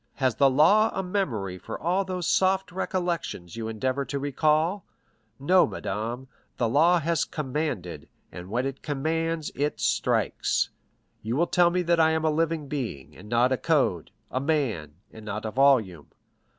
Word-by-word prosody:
Has 130 -4 0
the 140 -1 +5
law 185 +11 +5
a 190 - -1
memory 120 - -2
for - - -7
all 180 +4 +1
those 185 -2 -4
soft 190 0 +2
recollections 175 - -3
you 115 -1 -4
endeavor 130 +5 -1
to 140 - -4
recall? 155 +6 +1 0.6
No, 180 +7 +4
madame; 110 +6 -4 0.3
the 120 - +1
law 160 +9 +4
has 165 -1 0
commanded, 130 - -4 0.2
and 90 +1 -9
when 120 +5 -1
it 135 0 -5
commands 160 +2 -2
it 145 -5 -2
strikes. 110 - 0 0.5
You 115 +2 -3
will 170 +5 +3
tell 175 -1 +3
me 180 +1 0
that 170 0 +2
I 160 0 +5
am 160 0 0
a 155 - +3
living 160 -1 -1
being, 110 - -5
and 105 +3 -13
not 120 +2 +3
a 130 - +2
code—a 130 - -1
man, 130 - -1 0.2
and 110 - -11
not 105 +1 -5
a 110 - -3
volume. 115 - +2
140 Hz, 165 wpm, -26 LUFS, 110-165 Hz, 0.6 s, the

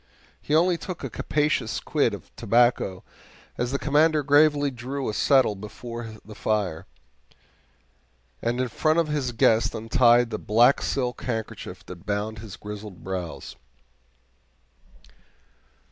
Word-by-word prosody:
He 150 - 0
only 170 +1 +3
took 180 +2 -7
a - - -4
capacious 145 -8 0
quid - - 0
of - - -15
tobacco 115 -4 +2 0.5
as 120 +1 -2
the 140 - 0
Commander 150 +2 +3
gravely 145 0 +4
drew 130 +3 -5
a 110 - -2
settle 130 -2 +3
before 110 +3 -8
the 110 - -10
fire, 105 -6 -2 1.5
and 120 +1 -1
in 130 - +1 0.2
honor 155 +1 +4
of 165 -2 0
his 145 -4 -1
guest 115 -1 +2
untied 120 +1 +3
the 110 - -3
black 120 +5 +4
silk 125 -3 -2
handkerchief 110 -3 -5
that 85 +1 -11
bound 105 +1 -2
his 105 -3 -9
grizzled 105 -2 -9
brows. 90 -3 -5
120 Hz, 130 wpm, -25 LUFS, 105-140 Hz, 1.5 s, gravely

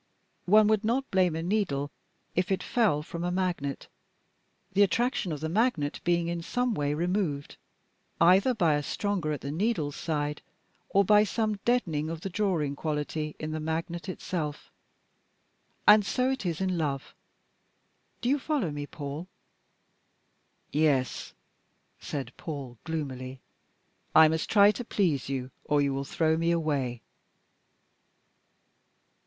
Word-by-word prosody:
One 210 +3 +6
would 215 0 +2
not 250 +5 0
blame 185 -4 +3
a 165 - -3
needle 170 -8 0 0.4
if 180 +2 0
it 190 - 0
fell 205 -11 +2
from 170 +2 -6
a 175 - 0
magnet, 180 -7 -2 0.9
the 200 - +3
attraction 205 0 +2
of 150 -2 -4
the 160 - -1
magnet 170 - 0
being 170 -1 +1
in 170 0 -2
some 245 +7 0
way 145 -5 0
removed, 170 -4 -1 0.6
either 190 +9 +5
by 170 -7 +3
a 145 - +1
stronger 185 0 -2
at 150 - -3
the 140 - -4
needle's 165 -4 -1
side, 150 -2 -2 0.5
or 200 0 +4
by 210 +2 +6
some 215 0 -1
deadening 165 -11 +1
of 165 -1 -5
the 195 - -5
drawing 170 -8 0
quality 150 0 -3
in 155 0 -4
the 155 - -3
magnet 165 +3 -3
itself 165 -5 -4 1.2
and 210 0 +8
so 255 +6 +1
it 260 -8 -2
is 170 +1 -2
in 185 -2 0
love. 140 -4 -2 1.1
Do 240 - 0
you 285 +2 +3
follow 275 - -1
me, 145 0 -5
Paul?" 145 +4 -6 1.5
"Yes." 145 -4 +1 0.6
said 140 -3 -5
Paul 135 -7 -6
gloomily. 135 -5 -4 0.8
"I 160 0 +9
must 160 0 -1
try 205 -1 +7
to 245 - -5
please 170 - 0
you, 130 -1 -3
or 150 0 +2
you 140 -1 +2
will 135 +1 -3
throw 160 +2 +1
me 165 +1 +1
away." 145 -8 0
165 Hz, 140 wpm, -28 LUFS, 145-200 Hz, 1.5 s, I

